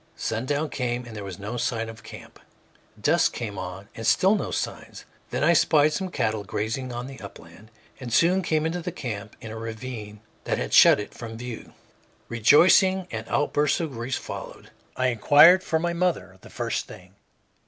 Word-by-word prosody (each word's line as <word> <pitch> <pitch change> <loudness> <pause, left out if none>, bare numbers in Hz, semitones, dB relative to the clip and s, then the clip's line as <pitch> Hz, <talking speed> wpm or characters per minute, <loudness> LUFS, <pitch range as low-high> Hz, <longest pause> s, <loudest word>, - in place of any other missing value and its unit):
Sundown 145 +7 -2
came, 125 -1 -2
and 115 -2 -10
there 105 - -6
were 100 - -6
no 105 +4 -5
signs 115 -1 -2
of 110 -2 -14
camp. - - -12 0.6
Dusk - - +2
came 105 -5 -5
on, 95 +2 -7
and 110 0 -5
still 190 +2 +4
no 210 - -1
signs. - - -5 0.2
Then - - -2
I 170 +3 +5
spied 155 -2 +4
some 190 +2 -3
cattle 110 -9 -1
grazing 115 +6 -3
on 120 0 -5
the 135 0 -10
upland, 100 +1 -13 0.3
and 125 -3 -7
soon 175 +9 +3
came 160 -3 0
upon 170 +2 -2
the - - -4
camp 105 -5 -6
in 110 - -8
a 110 - -7
ravine 110 -2 -7 0.2
that - - -1
had - - -4
shut - - +7
it 105 - -7
from 115 -1 -8
view. 120 -1 -8 0.6
Rejoicing 175 - +5
and 110 0 -5
outbursts 145 0 +1
of 165 -3 -3
grief 120 +1 -4
followed. - - -9 0.3
I 130 0 +2
inquired 145 - +6
for 160 - 0
my 170 +2 -1
mother 170 - -2
the - - -14
first - - -3
thing. 90 +1 -13
120 Hz, 185 wpm, -25 LUFS, 110-155 Hz, 0.6 s, shut